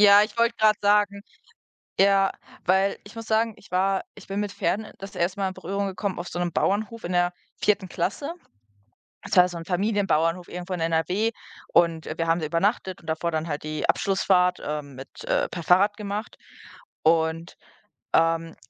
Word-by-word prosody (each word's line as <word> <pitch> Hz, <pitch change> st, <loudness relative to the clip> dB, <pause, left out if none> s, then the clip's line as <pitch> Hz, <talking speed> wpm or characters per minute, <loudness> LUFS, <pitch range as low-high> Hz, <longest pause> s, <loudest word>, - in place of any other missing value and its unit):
Ja, 205 Hz, 0 st, +8 dB
ich 210 Hz, +1 st, -3 dB
wollte 235 Hz, 0 st, +3 dB
gerade 215 Hz, -1 st, +4 dB
sagen 205 Hz, -1 st, +3 dB, 0.8 s
Ja, 195 Hz, 0 st, +4 dB, 0.3 s
weil 190 Hz, +2 st, +2 dB
ich 205 Hz, -, -13 dB
muss 225 Hz, 0 st, -7 dB
sagen, 225 Hz, 0 st, +1 dB
ich 205 Hz, -, -19 dB
war 190 Hz, +1 st, +1 dB
ich 210 Hz, -, -14 dB
bin 195 Hz, +1 st, -2 dB
mit 205 Hz, -1 st, -3 dB
Pferden, 205 Hz, +1 st, -1 dB
äh, -, -, -12 dB
das 195 Hz, 0 st, -9 dB
1. 180 Hz, +3 st, -1 dB
Mal 195 Hz, -, +1 dB
in 185 Hz, -, -4 dB
Berührung 195 Hz, +2 st, -3 dB
gekommen 190 Hz, 0 st, -3 dB
auf 175 Hz, -, -5 dB
so 175 Hz, -, -5 dB
'nem 175 Hz, -1 st, -1 dB
Bauernhof 215 Hz, +5 st, -1 dB
in 180 Hz, -, -3 dB
der 175 Hz, 0 st, +3 dB, 0.3 s
4. 205 Hz, -2 st, +2 dB
Klasse. 200 Hz, -, -2 dB, 0.9 s
Das -, -, -3 dB
war 180 Hz, 0 st, +7 dB
so 175 Hz, -1 st, -6 dB
'n 165 Hz, -, -8 dB
Familienbauernhof 180 Hz, -3 st, +1 dB
irgendwo 180 Hz, +1 st, -7 dB
in 180 Hz, -, -3 dB
NRW 165 Hz, +7 st, +1 dB, 0.4 s
und, 165 Hz, -2 st, +3 dB
äh, -, -, -4 dB
wir 165 Hz, -1 st, -1 dB
haben 165 Hz, +1 st, +3 dB
da 160 Hz, -, -2 dB
übernachtet 185 Hz, +3 st, 0 dB
und 165 Hz, -, -17 dB
davor 160 Hz, +2 st, -1 dB
dann 160 Hz, +1 st, -2 dB
halt 145 Hz, -1 st, -4 dB
die 155 Hz, 0 st, -3 dB
Abschlussfahrt, 180 Hz, -2 st, +2 dB
ähm, 150 Hz, -2 st, -4 dB
mit 135 Hz, -, -11 dB
äh, -, -, +1 dB
per 170 Hz, -, -6 dB
Fahrrad 195 Hz, +5 st, +4 dB
gemacht. 210 Hz, +1 st, -5 dB, 0.7 s
Und, 160 Hz, +1 st, +1 dB, 0.6 s
ähm 165 Hz, 0 st, +2 dB
185 Hz, 190 wpm, -25 LUFS, 170-205 Hz, 0.9 s, Ja